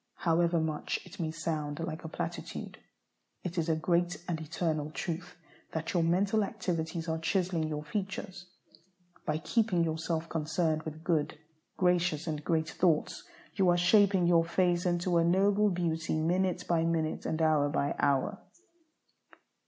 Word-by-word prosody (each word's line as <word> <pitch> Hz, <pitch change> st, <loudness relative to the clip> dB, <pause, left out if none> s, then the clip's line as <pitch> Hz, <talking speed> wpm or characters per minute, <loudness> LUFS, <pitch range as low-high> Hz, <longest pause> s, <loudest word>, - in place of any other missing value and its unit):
However 170 Hz, 0 st, +2 dB
much 155 Hz, -1 st, -2 dB
it 180 Hz, +2 st, -13 dB
may 165 Hz, -2 st, -1 dB
sound 155 Hz, -2 st, -3 dB
like 165 Hz, -1 st, -4 dB
a -, -, -5 dB
platitude, -, -, -5 dB, 0.6 s
it 175 Hz, -1 st, -4 dB
is 165 Hz, 0 st, -1 dB
a 160 Hz, -, +3 dB
great 175 Hz, +2 st, +1 dB
and 165 Hz, -3 st, -2 dB
eternal 155 Hz, -1 st, -2 dB
truth 170 Hz, +3 st, -5 dB, 0.4 s
that 160 Hz, +3 st, -3 dB
your 175 Hz, -, +3 dB
mental 195 Hz, +6 st, +2 dB
activities 170 Hz, -5 st, -3 dB
are 160 Hz, 0 st, -1 dB
chiselling 175 Hz, -2 st, 0 dB
your 150 Hz, -1 st, -3 dB
features. 190 Hz, +1 st, -5 dB, 0.8 s
By 155 Hz, -, +1 dB
keeping 175 Hz, +3 st, +1 dB
yourself 160 Hz, 0 st, -2 dB
concerned 160 Hz, 0 st, 0 dB
with 155 Hz, 0 st, -7 dB
good, 160 Hz, -3 st, 0 dB, 0.4 s
gracious, 180 Hz, -3 st, +2 dB
and 155 Hz, -3 st, -3 dB
great 160 Hz, -1 st, 0 dB
thoughts, 165 Hz, -4 st, +1 dB, 0.3 s
you 190 Hz, -3 st, +3 dB
are 175 Hz, -, +4 dB
shaping 190 Hz, 0 st, +4 dB
your 170 Hz, -1 st, +5 dB
face 175 Hz, +1 st, +1 dB
into 175 Hz, 0 st, +1 dB
a -, -, +3 dB
noble 200 Hz, +4 st, +3 dB
beauty 165 Hz, -3 st, -1 dB
minute 180 Hz, +3 st, 0 dB
by 165 Hz, -2 st, +2 dB
minute, 165 Hz, -1 st, -1 dB
and 160 Hz, -, -1 dB
hour 155 Hz, -3 st, +3 dB
by 145 Hz, 0 st, 0 dB
hour. 140 Hz, +9 st, +1 dB
165 Hz, 150 wpm, -31 LUFS, 160-180 Hz, 0.8 s, your